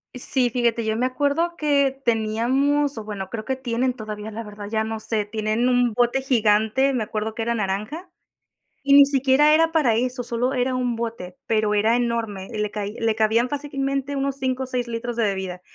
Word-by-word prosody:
Sí, 255 Hz, 0 st, +5 dB
fíjate, 235 Hz, -1 st, 0 dB
yo 220 Hz, 0 st, 0 dB
me 245 Hz, -, +1 dB
acuerdo 285 Hz, +6 st, 0 dB
que 280 Hz, -3 st, +1 dB
teníamos 250 Hz, +6 st, +1 dB
o 220 Hz, -, -5 dB
bueno, 200 Hz, -3 st, -6 dB
creo 220 Hz, 0 st, -6 dB
que 265 Hz, -, -1 dB
tienen 250 Hz, 0 st, -1 dB
todavía, 215 Hz, -2 st, -7 dB
la 225 Hz, +2 st, -6 dB
verdad, 205 Hz, -1 st, -9 dB
ya 220 Hz, -1 st, 0 dB
no 220 Hz, 0 st, -4 dB
sé, 215 Hz, -1 st, -2 dB
tienen 215 Hz, +3 st, -1 dB
un 245 Hz, -2 st, +2 dB
bote 245 Hz, +3 st, +1 dB
gigante, 230 Hz, +1 st, +2 dB
me 240 Hz, -4 st, 0 dB
acuerdo 220 Hz, 0 st, -4 dB
que -, -, -4 dB
era 235 Hz, +1 st, 0 dB
naranja, 215 Hz, -, -3 dB, 0.7 s
y 280 Hz, 0 st, +3 dB
ni 285 Hz, -, +9 dB
siquiera 275 Hz, +2 st, +3 dB
era 325 Hz, +1 st, +3 dB
para 300 Hz, -8 st, +2 dB
eso, 250 Hz, +2 st, -1 dB
sólo 240 Hz, +3 st, -1 dB
era 255 Hz, +1 st, 0 dB
un 250 Hz, -2 st, -1 dB
bote, 225 Hz, -6 st, -6 dB
pero 215 Hz, -1 st, +1 dB
era 220 Hz, +3 st, +3 dB
enorme, 230 Hz, -5 st, -2 dB
y 220 Hz, -, -6 dB
le 210 Hz, -1 st, -2 dB
cai 205 Hz, -1 st, -4 dB
le 225 Hz, -1 st, +1 dB
cabían 225 Hz, +2 st, +2 dB
fácilmente 275 Hz, 0 st, -3 dB
unos 275 Hz, 0 st, -2 dB
5 260 Hz, -1 st, -2 dB
o -, -, -3 dB
seis 250 Hz, -2 st, -3 dB
litros 235 Hz, +1 st, -4 dB
de 230 Hz, -, 0 dB
bebida, 190 Hz, -3 st, -3 dB
235 Hz, 200 wpm, -23 LUFS, 215-265 Hz, 0.7 s, ni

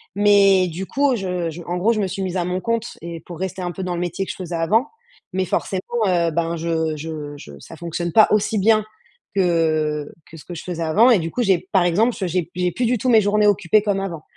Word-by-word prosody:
Mais 200 Hz, -2 st, +5 dB
du 175 Hz, +3 st, -5 dB
coup, 280 Hz, -2 st, +1 dB
je 180 Hz, -4 st, -2 dB
je 170 Hz, +3 st, -9 dB
en 175 Hz, +1 st, -3 dB
gros, 215 Hz, +6 st, +2 dB
je 215 Hz, -, -2 dB
me 200 Hz, -, 0 dB
suis 195 Hz, +1 st, -5 dB
mise 185 Hz, 0 st, -3 dB
à 175 Hz, -, 0 dB
mon 180 Hz, +1 st, -2 dB
compte 230 Hz, +1 st, -2 dB
et 170 Hz, 0 st, -7 dB
pour 170 Hz, -1 st, -10 dB
rester 190 Hz, 0 st, -4 dB
un 175 Hz, -1 st, -3 dB
peu 185 Hz, -, -6 dB
dans 180 Hz, -1 st, -2 dB
le -, -, -3 dB
métier 180 Hz, +2 st, -2 dB
que -, -, -4 dB
je -, -, -9 dB
faisais 175 Hz, -2 st, -5 dB
avant 215 Hz, -, +2 dB, 0.5 s
mais 190 Hz, 0 st, +1 dB
forcément, 205 Hz, +5 st, -2 dB
heu, 170 Hz, -2 st, +2 dB
ben, 165 Hz, +1 st, -1 dB
je 160 Hz, -1 st, -1 dB
je 150 Hz, -1 st, -6 dB
je 70 Hz, -, -12 dB
ça 165 Hz, -, -12 dB
fonctionne 170 Hz, +1 st, -4 dB
pas 220 Hz, -, +7 dB
aussi 210 Hz, 0 st, +1 dB
bien 215 Hz, +1 st, +3 dB, 0.5 s
que 155 Hz, -5 st, +1 dB, 0.2 s
que 165 Hz, -, -12 dB
ce -, -, -14 dB
que 175 Hz, -, -8 dB
je 160 Hz, -, -6 dB
faisais 170 Hz, -2 st, -4 dB
avant 205 Hz, +10 st, +4 dB
et 230 Hz, -, +6 dB
du 165 Hz, -1 st, -4 dB
coup, 250 Hz, -, -2 dB
j'ai 190 Hz, -4 st, +3 dB
par 190 Hz, -3 st, +4 dB
exemple, 215 Hz, +8 st, +2 dB
je 190 Hz, -, -1 dB
j'ai 175 Hz, 0 st, 0 dB
p 170 Hz, -, -19 dB
j'ai 180 Hz, 0 st, 0 dB
plus 250 Hz, -, -1 dB
du 245 Hz, +1 st, +1 dB
tout 255 Hz, -, 0 dB
mes 220 Hz, -2 st, +6 dB
journées 210 Hz, +1 st, +2 dB
occupées 205 Hz, 0 st, +3 dB
comme 200 Hz, -2 st, 0 dB
avant. 170 Hz, -5 st, -5 dB
180 Hz, 265 wpm, -21 LUFS, 165-205 Hz, 0.5 s, pas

